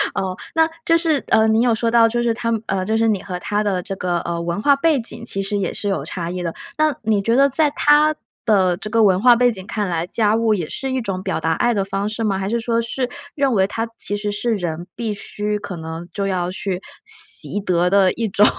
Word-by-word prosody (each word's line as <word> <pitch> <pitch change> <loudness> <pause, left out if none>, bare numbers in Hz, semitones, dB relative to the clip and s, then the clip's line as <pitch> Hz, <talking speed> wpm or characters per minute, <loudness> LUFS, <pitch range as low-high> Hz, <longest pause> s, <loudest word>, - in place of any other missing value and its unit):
哦， 185 -1 -2 0.2
那 320 0 +4 0.2
就 330 0 +4
是， 320 -4 +1
呃， 220 0 +4
你 220 +1 +3
有 240 -2 +3
说 230 +1 0
到 230 -1 +6
就 240 +1 -1
是 230 -1 +2
她 230 0 -2
们 225 -2 -1 0.3
就 220 0 +1
是 225 0 +2
你 205 -4 +1
和 180 -2 -5
她 205 +3 -1
的 190 -3 0
这 195 -2 -5
个， 175 -1 -1
呃， 170 0 -3
文 170 +4 -2
化 285 +2 +5
背 290 0 +2
景 230 0 -5
其 195 -4 -1
实 205 +1 -2
也 190 -3 -1
是 205 - -3
有 195 - -1
差 170 -2 -5
异 180 0 -4
的。 170 -2 -3 0.2
那 310 -3 +2
你 210 -2 +2
觉 230 +4 +1
得 275 +1 +5
在 300 +2 +3
她 300 +1 +4 0.3
的 190 -5 +3
这 215 - -7
个 225 0 +3
文 190 -1 +4
化 245 -1 +7
背 245 0 +3
景 190 -4 -7
看 210 -3 -2
来， 170 0 -2
家 215 +1 +2
务 225 -1 +2
也 170 -5 -3
是 270 -1 -3
一 260 - 0
种 195 -4 -3
表 - - -2
达 165 - 0
爱 240 - +1
的 195 -2 0
方 195 +1 -2
式 225 +1 -4
吗？ 200 -3 +1
还 195 +1 -2
是 235 +1 0
说 230 0 0
是 245 +2 -2 0.3
认 275 -4 +1
为 190 -2 +3
它 225 +2 -3
其 205 - -2
实 205 0 -2
是 225 +2 -1
人 175 -1 -4
必 225 -3 -2
须 210 +1 -3
可 190 - -6
能 160 +1 -7
就 200 +4 -2
要 180 -2 -1
去 190 0 -3 0.2
习 435 - 0
得 180 -2 +1
的 195 -1 +4
一 230 -1 -2
种， 205 +2 +4
210 Hz, 275 characters per minute, -20 LUFS, 190-235 Hz, 0.3 s, 化